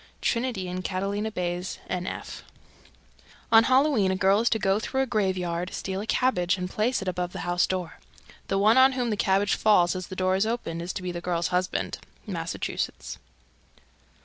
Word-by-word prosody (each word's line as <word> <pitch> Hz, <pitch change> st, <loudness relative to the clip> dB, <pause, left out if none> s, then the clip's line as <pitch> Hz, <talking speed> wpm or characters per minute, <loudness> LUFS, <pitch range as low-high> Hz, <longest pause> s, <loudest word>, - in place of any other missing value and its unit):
Trinity 235 Hz, -6 st, -1 dB
and 180 Hz, +1 st, -4 dB
Catalina 200 Hz, +3 st, -2 dB
Bays, 180 Hz, -2 st, -3 dB
N.F. 180 Hz, 0 st, -4 dB
309. -, -, -18 dB, 1.0 s
On 225 Hz, 0 st, +8 dB
Halloween 260 Hz, -6 st, +3 dB
a 190 Hz, -, +1 dB
girl 195 Hz, +1 st, +3 dB
is 235 Hz, -, +2 dB
to 225 Hz, -, +1 dB
go 195 Hz, -1 st, +1 dB
through 265 Hz, +4 st, -1 dB
a -, -, -1 dB
graveyard, 185 Hz, -6 st, -1 dB
steal 190 Hz, 0 st, -3 dB
a 215 Hz, -, -7 dB
cabbage 185 Hz, -9 st, +1 dB
and 180 Hz, 0 st, -3 dB
place 215 Hz, +4 st, 0 dB
it -, -, -9 dB
above 180 Hz, -1 st, -2 dB
the 190 Hz, -, -5 dB
house 175 Hz, 0 st, +2 dB
door. 180 Hz, -3 st, -4 dB, 0.5 s
The 195 Hz, -, 0 dB
one 215 Hz, +5 st, +5 dB
on 265 Hz, +1 st, +6 dB
whom 245 Hz, -3 st, -1 dB
the -, -, +1 dB
cabbage 195 Hz, 0 st, +2 dB
falls 185 Hz, -5 st, +3 dB
as 185 Hz, -1 st, -5 dB
the 185 Hz, -, -7 dB
door 185 Hz, 0 st, +1 dB
is 195 Hz, +3 st, +1 dB
opened 170 Hz, -8 st, -3 dB
is 175 Hz, +2 st, -4 dB
to 185 Hz, -, -5 dB
be 180 Hz, -, -3 dB
the 175 Hz, 0 st, -5 dB
girl's 170 Hz, -1 st, -1 dB
husband. 180 Hz, 0 st, -1 dB, 0.3 s
_Massachusetts. 170 Hz, -4 st, -4 dB
190 Hz, 190 wpm, -26 LUFS, 180-220 Hz, 1.0 s, On